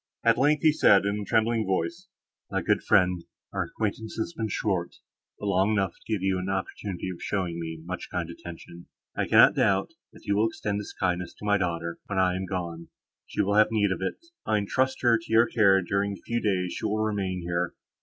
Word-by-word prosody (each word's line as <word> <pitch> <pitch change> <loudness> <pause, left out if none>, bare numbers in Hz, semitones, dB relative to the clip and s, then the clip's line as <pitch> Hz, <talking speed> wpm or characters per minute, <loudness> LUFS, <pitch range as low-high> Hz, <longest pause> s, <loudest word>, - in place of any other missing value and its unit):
At 115 -1 +5
length, 145 +2 +3
he 155 - +6
said, 100 -9 +5
in 100 +1 0
a 105 - -5
trembling 115 0 +2
voice, 170 - -2 0.4
"My - - -1
good - - +2
friend, 90 -2 +3 0.3
our - - -1
acquaintance 110 +1 -4
has 115 +10 -3
been 110 - -2
short, 95 -4 -1 0.4
but - - -7
long 100 +1 +2
enough 95 -4 0
to - - -13
give 100 -4 0
you 95 -1 +1
an 90 +1 -4
opportunity 95 -1 -3
of 90 - -10
showing 90 -4 -2
me 80 -1 -6
much 90 +1 -5
kind 85 -2 -2
attention. 85 0 -10 0.3
I - - -1
cannot - - +7
doubt, - - +2 0.2
that - - -17
you 100 - +1
will 110 +2 +3
extend 105 -2 -3
this 105 - -7
kindness 90 -2 -2
to - - -10
my 105 -1 +3
daughter, 85 -2 -2
when 100 - -3
I 90 -1 +3
am 95 0 -3
gone; 85 -3 -4 0.4
she - - 0
will 100 - 0
have 110 - +7
need 105 -3 +2
of 95 - -2
it. 95 - -2 0.3
I 110 - +1
entrust 130 +7 0
her 120 -2 +5
to 110 - -12
your 115 +1 +6
care 100 -5 +4
during 100 +2 -1
the - - -15
few 120 0 -1
days 90 -4 0
she - - -6
will 105 - 0
remain 95 -4 -1
here. 85 0 -2
100 Hz, 220 wpm, -27 LUFS, 90-110 Hz, 0.4 s, cannot